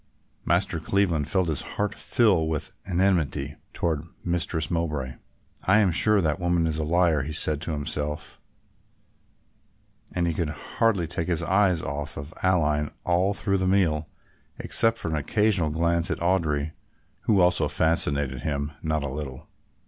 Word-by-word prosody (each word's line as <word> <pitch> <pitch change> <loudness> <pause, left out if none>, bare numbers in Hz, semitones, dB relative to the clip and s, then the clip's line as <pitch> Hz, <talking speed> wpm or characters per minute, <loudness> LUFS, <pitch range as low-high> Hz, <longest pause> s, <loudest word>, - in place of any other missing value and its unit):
Master 80 - +1
Cleveland 85 -4 0
felt 95 -3 +1
his 75 -4 0
heart 105 0 -3
fill 95 -9 +2
with 80 -2 -3 0.2
enmity 85 -6 0
toward 80 -1 -2 0.2
Mistress 85 -2 -1
Mowbray. 75 -6 -2 0.5
"I 95 +3 +6
am 100 -4 +4
sure 105 +4 +4
that 75 -3 0
woman 85 -1 +1
is 80 -1 -1
a - - 0
liar," 85 -1 +2
he 75 +3 -5
said 75 -1 +3
to 85 - -3
himself, 75 +1 -4 1.8
and 90 -1 +1
he 85 - 0
could 80 -1 -2
hardly 95 +5 0
take 80 +1 -3
his 85 -2 0
eyes 95 -2 +2
off 70 +1 -5 0.2
Aline 75 -5 +2
all 90 +3 +1
through 100 -1 0
the 95 - 0
meal, 85 -6 +2 0.5
except 115 0 +3
for - - -3
an 80 - -1
occasional 95 +2 +1
glance 85 +2 0
at - - -1
Audry, 80 -4 0 0.5
who 105 -3 +3
also 90 0 +3
fascinated 70 -5 +1
him 70 0 -2
not 80 -1 -1
a - - -2
little. 70 -2 -7
80 Hz, 150 wpm, -25 LUFS, 75-90 Hz, 1.8 s, I